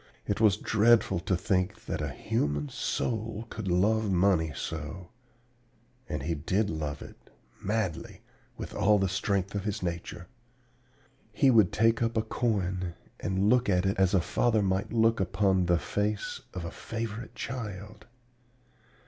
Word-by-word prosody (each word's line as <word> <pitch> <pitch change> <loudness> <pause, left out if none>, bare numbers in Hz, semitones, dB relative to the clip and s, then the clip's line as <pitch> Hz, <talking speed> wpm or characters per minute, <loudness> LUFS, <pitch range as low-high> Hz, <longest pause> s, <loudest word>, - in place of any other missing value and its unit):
It 100 +2 -1
was 105 -3 +5
dreadful 110 -4 +3
to 90 +1 0
think 90 0 -1
that - - -3
a - - -2
human 75 0 -1
soul 110 - -2
could 110 -3 -5
love 105 +4 +2
money 90 -4 +3
so. 80 +5 -5 1.0
And 75 -3 -3
he 85 +4 -1
did 95 +7 0
love 75 -2 -4
it - - -15 0.3
madly, 105 -6 -2 0.4
with - - -6
all 105 +1 +4
the 95 -1 +1
strength 95 0 -1
of 100 -1 -2
his 105 -1 -3
nature. 85 0 -4 1.1
"He 135 -2 +4
would 110 -7 +5
take 115 +1 +3
up 115 -1 0
a 110 - +2
coin 95 -6 -1 0.2
and 95 +1 0
look 125 0 +3
at 90 -1 +2
it 95 0 0
as 95 0 +4
a 95 - +4
father 110 +6 +1
might 95 0 0
look 115 0 +3
upon 95 -1 +2
the 90 -1 +4
face 105 +4 -2
of 90 -2 -4
a 85 - -5
favorite 115 0 -6
child. 105 -3 -6
100 Hz, 150 wpm, -29 LUFS, 90-110 Hz, 1.1 s, was